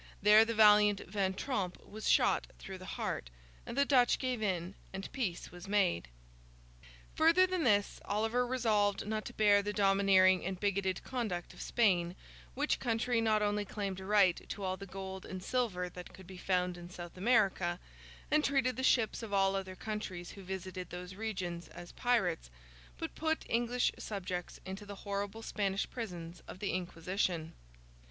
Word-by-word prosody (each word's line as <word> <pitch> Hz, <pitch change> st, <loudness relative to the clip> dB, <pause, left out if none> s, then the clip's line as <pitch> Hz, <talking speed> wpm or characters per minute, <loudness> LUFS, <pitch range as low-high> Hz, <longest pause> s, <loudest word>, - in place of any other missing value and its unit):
There, 210 Hz, +2 st, +7 dB
the 230 Hz, 0 st, -2 dB
valiant 210 Hz, -1 st, +6 dB
Van 190 Hz, -1 st, -1 dB
Tromp 195 Hz, -6 st, -2 dB
was 215 Hz, +1 st, -4 dB
shot -, -, +3 dB
through 190 Hz, -1 st, -8 dB
the 185 Hz, -, -7 dB
heart, -, -, -3 dB, 0.4 s
and -, -, -6 dB
the 280 Hz, -, +4 dB
Dutch 255 Hz, -4 st, +4 dB
gave 255 Hz, -3 st, -2 dB
in, 185 Hz, -3 st, -1 dB, 0.2 s
and 190 Hz, 0 st, -6 dB
peace 205 Hz, -11 st, -3 dB
was 175 Hz, +1 st, -10 dB
made. 195 Hz, -, +1 dB, 1.1 s
Further 330 Hz, +4 st, +5 dB
than 370 Hz, -3 st, -1 dB
this, 205 Hz, -3 st, +2 dB
Oliver 220 Hz, +4 st, +1 dB
resolved 215 Hz, -6 st, +1 dB
not 215 Hz, 0 st, -2 dB
to -, -, -7 dB
bear 205 Hz, -1 st, +5 dB
the 205 Hz, +1 st, -3 dB
domineering 195 Hz, -2 st, +4 dB
and 185 Hz, 0 st, -3 dB
bigoted 195 Hz, -2 st, 0 dB
conduct 215 Hz, -9 st, -3 dB
of -, -, -11 dB
Spain, 180 Hz, -6 st, +2 dB, 0.4 s
which -, -, 0 dB
country 230 Hz, 0 st, +1 dB
not 215 Hz, -1 st, +2 dB
only 205 Hz, 0 st, +1 dB
claimed 195 Hz, -2 st, -4 dB
a -, -, -8 dB
right 200 Hz, -3 st, +4 dB
to 205 Hz, -, -5 dB
all 185 Hz, 0 st, -1 dB
the 195 Hz, +1 st, -9 dB
gold 190 Hz, 0 st, -6 dB
and 185 Hz, -1 st, -7 dB
silver 210 Hz, -7 st, -1 dB
that 180 Hz, 0 st, -10 dB
could 190 Hz, -, -13 dB
be 185 Hz, +1 st, -10 dB
found 180 Hz, -1 st, 0 dB
in 175 Hz, 0 st, -9 dB
South 175 Hz, -1 st, -9 dB
America, 190 Hz, -4 st, +2 dB, 0.5 s
and 305 Hz, 0 st, +4 dB
treated 270 Hz, -3 st, +1 dB
the -, -, -1 dB
ships 235 Hz, -4 st, +3 dB
of 225 Hz, -3 st, -7 dB
all 195 Hz, -1 st, +3 dB
other 190 Hz, -1 st, -4 dB
countries 190 Hz, -4 st, -5 dB
who 200 Hz, -, -11 dB
visited 185 Hz, -1 st, -6 dB
those 180 Hz, +1 st, -7 dB
regions, 185 Hz, -5 st, -4 dB
as 175 Hz, 0 st, -11 dB
pirates, 235 Hz, -, 0 dB, 0.5 s
but -, -, -5 dB
put 320 Hz, 0 st, -1 dB
English 240 Hz, +1 st, +1 dB
subjects 180 Hz, -4 st, -5 dB
into 190 Hz, +2 st, -6 dB
the 205 Hz, 0 st, -8 dB
horrible 200 Hz, +2 st, -3 dB
Spanish 195 Hz, -3 st, -1 dB
prisons 175 Hz, -8 st, -6 dB
of -, -, -8 dB
the 200 Hz, +1 st, -2 dB
Inquisition. 175 Hz, -1 st, -2 dB
200 Hz, 170 wpm, -33 LUFS, 185-220 Hz, 1.1 s, There